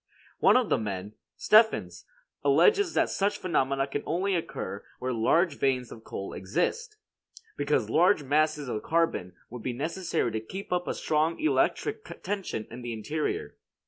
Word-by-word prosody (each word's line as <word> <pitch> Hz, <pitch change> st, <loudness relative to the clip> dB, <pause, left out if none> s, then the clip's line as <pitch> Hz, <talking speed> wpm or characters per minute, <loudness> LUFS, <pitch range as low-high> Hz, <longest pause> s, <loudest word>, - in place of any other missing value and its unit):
One -, -, +6 dB
of 250 Hz, -5 st, 0 dB
these -, -, +3 dB
men, 100 Hz, -1 st, -4 dB, 0.2 s
Steffens, 220 Hz, +1 st, +3 dB, 0.4 s
alleges 405 Hz, -5 st, +4 dB
that -, -, +2 dB
such 200 Hz, +1 st, 0 dB
phenomena 135 Hz, -6 st, 0 dB
can 140 Hz, +1 st, -3 dB
only 185 Hz, +5 st, 0 dB
occur 170 Hz, -3 st, -4 dB
where 130 Hz, 0 st, -2 dB
large 150 Hz, +8 st, +2 dB
veins 130 Hz, -3 st, 0 dB
of 110 Hz, -, -10 dB
coal 100 Hz, -, -6 dB
exist, 425 Hz, -, -2 dB, 0.6 s
because -, -, 0 dB
large 155 Hz, -, +3 dB
masses 150 Hz, 0 st, +1 dB
of 110 Hz, -3 st, -3 dB
carbon 165 Hz, -, 0 dB, 0.2 s
would 125 Hz, -1 st, -7 dB
be 125 Hz, -, -3 dB
necessary 160 Hz, -1 st, -1 dB
to 110 Hz, -, -2 dB
keep 185 Hz, -, -6 dB
up 180 Hz, 0 st, -1 dB
a -, -, -1 dB
strong 155 Hz, +2 st, 0 dB
electric 430 Hz, +7 st, +1 dB, 0.2 s
tension 190 Hz, -, -3 dB
in 120 Hz, +2 st, -8 dB
the 120 Hz, -1 st, -4 dB
interior. 155 Hz, -, -3 dB
155 Hz, 155 wpm, -28 LUFS, 120-190 Hz, 0.6 s, One